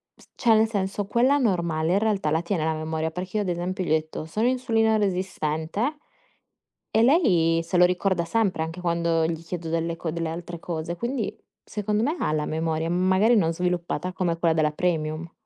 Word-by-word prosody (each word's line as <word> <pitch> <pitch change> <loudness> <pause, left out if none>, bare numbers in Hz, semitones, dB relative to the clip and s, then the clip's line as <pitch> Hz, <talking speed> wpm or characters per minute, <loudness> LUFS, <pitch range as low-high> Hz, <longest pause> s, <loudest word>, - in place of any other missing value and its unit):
s - - -20
cioè 230 -2 +3
nel 220 +1 +4
senso 200 -1 -2
quella 245 +7 +3
normale 170 - +1
in 195 - +3
realtà 205 -8 0
la 160 +1 +2
tiene 170 -2 -1
la 160 - +1
memoria, 160 0 -2
perché 180 +5 -4
io 210 - +1
ad 190 - -3
esempio 180 +2 -2
gli 175 - -4
ho - - +5
detto: 155 0 -2
"Sono 215 +9 0
insulino 225 -4 +2
resistente" 185 - -1 1.0
e 225 - +5
lei 180 - +4
se 170 +2 -1
lo 180 - +7
ricorda 180 -1 +1
sempre, 195 -3 0
anche 165 +3 -6
quando 170 -1 +1
gli 165 0 -4
chiedo 165 -1 -5
delle 165 0 -1
co 165 - -4
delle 165 0 -2
altre 170 +1 -6
cose. 165 0 -4
Quindi 235 +4 -3 0.3
secondo 210 0 -2
me 290 +8 0
ha - - 0
la 155 -1 0
memoria, 160 0 -1
magari 185 +6 +3
non 165 -6 +2
sviluppata 180 0 -2
come 175 -2 -1
quella 165 -1 +2
della 155 -1 +2
premium. 160 0 -2
175 Hz, 195 wpm, -25 LUFS, 160-205 Hz, 1.0 s, lo